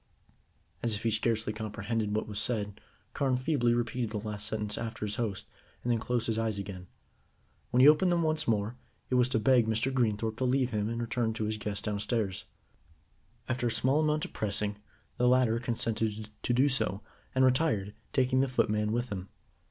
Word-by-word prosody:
As 115 -2 +1
if 105 - -5
he 115 - +2
scarcely 110 0 +1
comprehended 110 0 -2
what 110 - -1
was 105 -1 -2
said, 105 -3 0 0.3
Carne 135 -3 +1
feebly 130 -3 +2
repeated 120 0 -1
the 110 - -3
last 105 -1 -4
sentence 105 -1 -2
after 115 -2 -4
his 105 0 -1
host, 105 -5 -2 0.4
and 120 - 0
then 115 - +2
closed 120 0 -1
his 115 -1 0
eyes 110 -2 -1
again. 95 -2 -6 0.8
When 125 - +3
he 135 - +9
opened 155 +4 +6
them 170 -1 +2
once 155 -1 0
more, 110 +2 0 0.3
it - - +1
was 125 0 +4
to 120 - +1
beg 120 0 +4
Mr. 115 +4 +1
Greenthorpe 110 -3 0
to 130 - -2
leave 130 0 +2
him 105 -1 -1
and 115 0 -3
return 115 -1 -1
to 110 - -3
his 110 0 -2
guests 100 -1 -3
downstairs. 105 -1 -1 1.0
After 125 -1 0
a - - 0
small 135 +6 +2
amount 155 +1 +1
of - - -11
pressing, 105 0 -1 0.4
the 125 - +3
latter 125 -2 +4
consented 110 -2 -2
to - - -1
do 130 +4 +4
so, 115 -7 0 0.3
and 130 0 +5
retired, 130 -7 +2 0.2
taking 130 -1 +2
the 135 - +2
footman 105 -4 +1
with 120 +2 -1
him. 95 -2 -5
115 Hz, 190 wpm, -30 LUFS, 105-125 Hz, 1.0 s, he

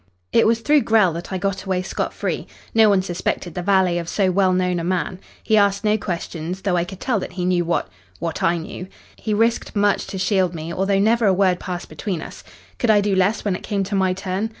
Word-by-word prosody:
"It - - +5
was 230 0 +2
through 295 +4 +4
Grell 215 -8 +3
that 170 +4 -7
I 190 - -1
got 195 0 -2
away 185 -2 -1
scot - - -3
free. - - -3 0.3
No 220 -1 +6
one 195 -2 +3
suspected 175 -1 -3
the 180 - -3
valet 185 -2 +2
of 170 0 -5
so 190 -3 +1
well 190 0 +3
known 180 -1 +1
a - - -3
man. 180 0 -1 0.2
He 220 - +3
asked 200 0 +3
no 210 0 +3
questions, 180 -3 -4
though 195 -3 +1
I 170 -1 +1
could 190 +1 -10
tell 245 -6 0
that 180 - -6
he 180 -1 -3
knew 180 -1 +2
what 170 - 0 0.3
what 165 0 -4
I 170 +1 +2
knew. 170 +2 -7 0.3
He 215 -2 -2
risked 230 +1 +1
much 205 -1 +2
to 195 - -5
shield 185 -2 +1
me, 160 +1 -5
although 195 +2 +1
never 220 +2 +3
a 195 - +5
word 185 -2 +2
passed 180 -2 -5
between 165 +3 -4
us. - - -10 0.4
Could 240 - +1
I 210 -1 +6
do 205 -1 +1
less 195 +4 +1
when 200 -3 +1
it - - -7
came 200 -2 -1
to 200 +2 -6
my 190 -1 +2
turn? 190 +3 -3
190 Hz, 240 wpm, -21 LUFS, 180-205 Hz, 0.4 s, No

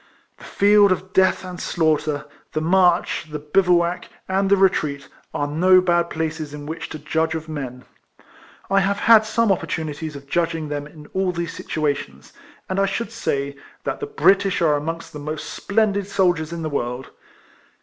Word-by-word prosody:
The - - -12
field 205 0 +4
of 185 +1 -2
death 190 0 +3
and 180 -1 -7
slaughter, 155 -3 0 0.3
the 155 - 0
march, 175 +1 +2
the 150 - -4
bivouac, 175 +3 +1 0.2
and 195 +1 +1
the 200 - +5
retreat, 155 -7 +1 0.2
are 145 - -1
no 185 +5 +5
bad 175 -2 +2
places 155 -2 -4
in 145 -1 -8
which 160 +2 -6
to - - -6
judge 160 +2 -1
of 160 0 -5
men. 130 -5 -6 0.8
I 195 +1 +3
have 200 +1 +1
had 220 -1 +7
some 225 -1 +2
opportunities 155 -4 -3
of 140 0 -9
judging 165 0 -1
them 145 0 -4
in 150 0 -14
all 190 -1 +1
these 170 -1 -4
situations, 140 - -3 0.3
and 190 +1 -1
I 195 - +3
should 200 +3 -3
say, 140 -11 -2 0.3
that - - -3
the 430 - -4
British 200 - +3
are 160 -3 +3
amongst 165 +3 -4
the 150 - -7
most 155 +1 -5
splendid 200 -2 0
soldiers 175 -5 +1
in 170 -1 -5
the 155 - -2
world. 125 -1 -3
165 Hz, 170 wpm, -22 LUFS, 150-190 Hz, 0.8 s, had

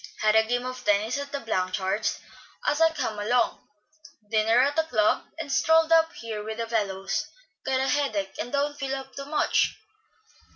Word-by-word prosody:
Had 215 0 +3
a 220 - +7
game 245 +2 -1
of 255 0 -6
tennis 210 +5 +1
at 285 0 -6
the 280 - -3
Blanchards' 190 -1 -1 0.5
as 295 +2 +1
I 325 - +7
came 220 -9 -3
along, 235 +4 +1 0.7
dinner 225 +2 +3
at 285 +2 +1
the 320 - +4
club, 215 -9 +1
and 325 -3 -5
strolled 320 +2 +3
up 325 0 +5
here 220 -2 -6
with 220 +1 -5
the 230 - -2
fellows. 195 -4 -1 0.4
Got 260 0 +1
a 265 - 0
headache, 215 -11 0
and 245 - -4
don't 290 +1 0
feel 270 0 -2
up 265 0 -8
to 275 - -5
much." 300 +1 +1
245 Hz, 180 wpm, -26 LUFS, 215-285 Hz, 0.7 s, a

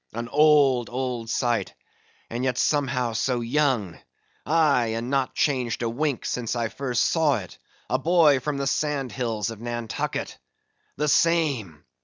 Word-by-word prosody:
An 115 +1 -5
old, 145 -5 +4
old 125 -2 -3
sight, 120 0 -1 0.5
and 120 +2 -4
yet 130 -2 0
somehow 130 -6 0
so 120 +2 0
young; 120 - 0 0.5
aye, 145 -7 +3
and 120 +3 -4
not 135 -2 0
changed 125 -5 0
a 115 - 0
wink 145 +1 -2
since 125 -1 -2
I 115 -2 -1
first 125 -2 -1
saw 155 -5 +2
it, 95 -4 -9 0.3
a 130 - 0
boy, 155 -2 +4
from 145 +2 -3
the 140 - -2
sand 140 -2 -1
hills 115 -1 -2
of 110 -1 -10
Nantucket! 120 -2 -4 0.6
The 150 +2 0
same! 140 - +1
125 Hz, 150 wpm, -25 LUFS, 115-145 Hz, 0.6 s, old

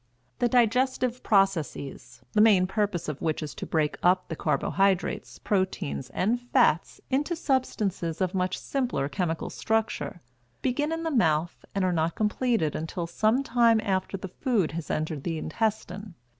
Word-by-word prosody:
The 240 - +2
digestive 250 +1 +2
processes, 160 - 0
the 210 - +4
main 205 -4 +6
purpose 195 -3 -1
of 150 -2 -4
which 160 -1 -1
is 150 - -6
to - - -7
break 155 -2 0
up 180 +1 +3
the 160 - -3
carbohydrates, 195 +3 0
proteins, 185 - -1
and 225 +6 0
fats 245 0 +2
into 295 +6 +1
substances 210 - -1
of 185 0 0
much 185 -1 0
simpler 245 - -1
chemical 165 0 -2
structure, 220 -5 -1 0.4
begin 290 +5 0
in 325 0 -2
the 325 - -1
mouth 165 - +1
and 195 -1 +1
are 180 - +1
not 165 0 0
completed 215 - +1
until 165 +2 -3
some 220 +9 +1
time 235 -3 +4
after 195 -1 -1
the 190 - -6
food 205 - 0
has 165 0 -5
entered 155 -2 -2
the 165 -2 -2
intestine. 205 -1 -3
195 Hz, 155 wpm, -27 LUFS, 165-235 Hz, 0.4 s, main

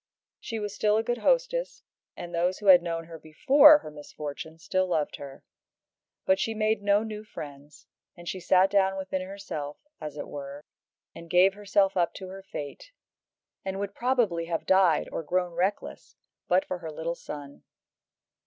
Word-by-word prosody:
She 225 - -5
was 210 -2 -4
still 210 +1 +2
a 220 - +1
good 240 +1 -2
hostess, - - 0 0.3
and 175 0 -7
those 175 +2 +1
who 210 - -10
had 185 -3 +8
known 165 -1 -3
her 165 -1 -10
before 285 - +7
her 155 - -10
misfortune 150 +1 -8
still 185 +3 0
loved 160 -4 -1
her. 140 -1 -10 0.8
But 190 - +3
she 225 - -1
made 215 -1 +1
no 205 +1 +3
new 215 -1 -6
friends, 145 -7 -11 0.3
and 175 0 -12
she 185 - -3
sat 185 +2 +4
down 195 -1 +2
within 190 0 -3
herself, 185 -7 -6 0.2
as 150 -2 -7
it 145 - -5
were, 140 0 -8 0.5
and 170 - -11
gave 185 +3 +5
herself 200 -1 +1
up 175 -2 +1
to 190 -1 -8
her 195 +1 -9
fate, 170 - -8 0.7
and 190 0 -4
would 200 0 -4
probably 235 -10 +1
have 165 -1 -3
died 190 -4 +4
or - - -3
grown 180 +2 -1
reckless 185 +4 -3 0.3
but 180 +1 +3
for 180 - -4
her 165 -2 -7
little 160 +2 -3
son. 145 -4 -9
185 Hz, 170 wpm, -27 LUFS, 160-205 Hz, 0.8 s, had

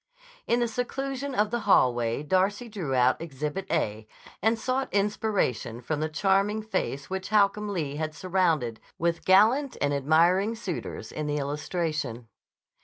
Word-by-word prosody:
In 240 +1 +2
the 240 - +2
seclusion 270 +3 -3
of 210 -1 +2
the 240 - 0
hallway 120 -5 +3
Darcy 190 +8 +1
drew 180 - -3
out 125 +3 +3
Exhibit 150 +4 -4
A 110 -9 -1 0.3
and 220 +3 +2
sought 255 +3 -1
inspiration 200 - 0
from 145 +5 -3
the 155 +1 -1
charming 195 +6 +1
face 140 -9 -3
which 190 0 -3
Holcomb 210 0 +2
Lee 150 -7 -3
had 155 0 -3
surrounded 165 -11 0 0.2
with 170 0 -1
gallant 225 +9 +4
and 145 0 +1
admiring 170 +9 +3
suitors 200 -7 -5
in 155 -1 -4
the 150 0 -1
illustration. 145 -4 -3
180 Hz, 145 wpm, -27 LUFS, 145-210 Hz, 0.3 s, gallant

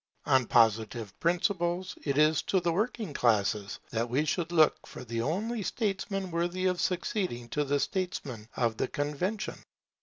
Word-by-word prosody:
On 130 -3 +3
Positive 110 -2 +2
principles, 175 0 0
it 140 -2 -1
is 155 0 +4
to 190 - +1
the 175 -1 0
working 215 -2 -1
classes 105 -4 +1
that 115 +1 -1
we 140 +6 +1
should 170 +2 -1
look 160 -3 +3
for - - -9
the 115 -1 -3
only 210 - -1
statesmen 195 -2 -2
worthy 175 +2 -1
of 180 -1 +1
succeeding 180 - -1
to 150 +4 0
the 145 0 +1
statesmen 140 - -3
of 115 -2 +1
the - - 0
Convention. 150 +9 -2
160 Hz, 155 wpm, -30 LUFS, 120-185 Hz, -, is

